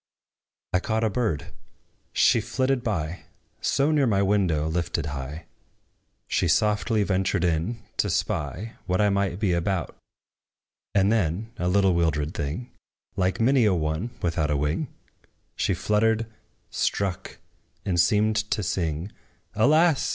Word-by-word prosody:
I 90 - +4
caught 110 +4 -1
a 110 - +1
bird: 90 -7 -2 0.6
She - - +4
flitted 130 -1 0
by, 90 -5 -3 0.4
So 140 +3 +2
near 145 -4 +3
my 100 -3 +2
window 95 -7 +2
lifted 85 -1 -1
high, 70 +2 -6 0.8
She - - +1
softly 105 +1 +2
ventured 95 -1 0
in, 90 +7 -1
to - - +1
spy 110 +7 -2
What 90 0 +1
I 105 -1 +4
might 100 -2 0
be 100 -4 +1
about: 85 +1 -1 1.0
And 100 +1 +4
then, 105 +1 0
a 90 - -1
little 95 0 +3
wildered 80 -3 0
thing, 80 - -4 0.4
Like 95 -1 0
many 130 +2 +4
a 100 -3 +3
one 80 +6 -1
without 80 -3 0
a 75 - +1
wing, 75 - -1 0.7
She 95 - 0
fluttered, 110 +4 +1 0.5
struck, 95 -3 -2 0.5
and 90 -4 0
seemed 105 +5 +3
to 105 - 0
sing, 85 +1 -2 0.4
"Alas! 155 +7 +3
95 Hz, 135 wpm, -25 LUFS, 85-110 Hz, 1.0 s, I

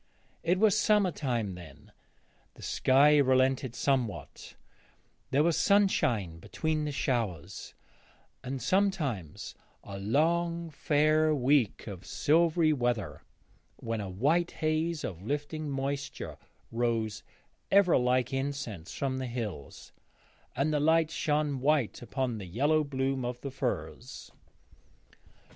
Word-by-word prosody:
It 175 +3 +1
was 210 0 +4
summer 210 -3 +3
time 120 - -2
then; 80 -5 -13 0.6
the - - -13
sky 145 +3 +4
relented 130 -2 +2
somewhat; 130 -6 -2 0.7
there 140 +3 +3
was 170 -1 +2
sunshine 120 - +2
between 155 - -2
the 150 - -2
showers, 115 - -3 0.7
and 130 +1 -4
sometimes 130 - -1 0.3
a 100 0 -8
long 165 +9 0
fair 155 +1 +2
week 135 -4 +2
of 95 -4 -8
silvery 160 0 +3
weather, 120 -7 -2 0.5
when 115 -2 -4
a 100 - -5
white 150 - +1
haze 155 +1 -1
of 90 -4 -5
lifting 145 +6 -3
moisture 140 0 -4 0.3
rose 115 -2 -1 0.5
ever, 195 -3 +5
like 125 0 +1
incense, 135 - -4
from 130 -2 -2
the 130 - -3
hills, 110 - -6 0.6
and 140 +4 0
the 150 - +2
light 160 +1 +3
shone 150 -4 0
white 140 -3 +1
upon 125 -2 -3
the 95 - -7
yellow 145 - +2
bloom 135 -2 -2
of 120 0 -4
the 140 - -5
furze. 120 - -5
135 Hz, 115 wpm, -29 LUFS, 115-155 Hz, 0.7 s, ever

